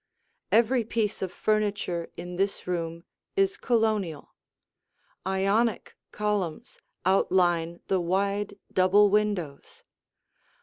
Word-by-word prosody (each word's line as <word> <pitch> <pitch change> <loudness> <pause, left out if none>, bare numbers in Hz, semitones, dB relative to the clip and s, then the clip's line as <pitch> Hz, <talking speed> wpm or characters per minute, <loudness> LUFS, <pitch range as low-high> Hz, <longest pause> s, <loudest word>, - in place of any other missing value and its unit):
Every 235 +2 +4
piece 220 -1 -2
of 190 -2 -2
furniture 205 -5 -1
in 175 +1 -6
this 195 +2 -1
room 170 -2 -3 0.3
is 390 0 +2
Colonial. 215 - 0 0.9
Ionic 200 +4 +1 0.2
columns 205 -6 -2 0.3
outline 175 -3 +2
the 190 - +2
wide 200 +3 -1 0.2
double 195 +2 +5
windows. 200 -9 -1
195 Hz, 90 wpm, -27 LUFS, 175-210 Hz, 0.9 s, double